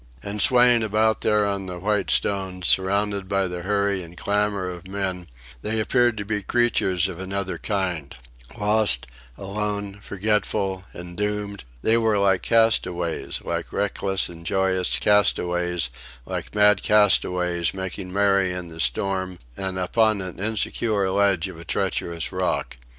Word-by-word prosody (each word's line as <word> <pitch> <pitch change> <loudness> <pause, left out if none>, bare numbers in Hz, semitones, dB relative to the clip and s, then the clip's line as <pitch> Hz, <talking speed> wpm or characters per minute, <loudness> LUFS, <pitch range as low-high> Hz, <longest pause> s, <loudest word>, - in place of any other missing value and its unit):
And 100 +1 -2
swaying 125 0 +6
about 110 +1 +1
there 105 -1 +2
on 100 -1 -2
the 90 -1 -6
white 105 +2 -1
stones, 95 -2 -1
surrounded 100 +1 +2
by 100 -1 +1
the 90 0 -5
hurry 100 0 0
and 85 0 -12
clamour 100 -2 0
of 90 0 -7
men, 95 -2 -3 0.3
they 110 +1 -1
appeared 120 +1 +2
to 105 - -4
be 105 0 -2
creatures 95 -5 +1
of 90 -2 -7
another 95 0 -3
kind 90 -8 -2 0.4
lost, 105 - +3 0.3
alone, 100 0 -3
forgetful, 100 -2 0
and 85 0 -9
doomed; 105 -3 -3 0.2
they 115 +1 +4
were 110 -2 +2
like 95 -2 +3
castaways, 90 -7 +1
like - - -4
reckless 100 -1 -1
and 85 -1 -11
joyous 95 0 0
castaways, 90 -7 +2 0.3
like - - -6
mad 105 -1 +5
castaways 90 -4 +3
making 95 -1 -6
merry 100 -1 +2
in 90 -1 -5
the 80 0 -11
storm 95 +6 -1 0.2
and 95 -1 -4
upon 110 +3 +2
an 90 -2 -6
insecure 105 -1 -1
ledge 100 -3 +2
of 90 -4 -10
a - - -9
treacherous 85 +1 -2
rock. 95 -7 -2
100 Hz, 145 wpm, -23 LUFS, 90-105 Hz, 0.4 s, swaying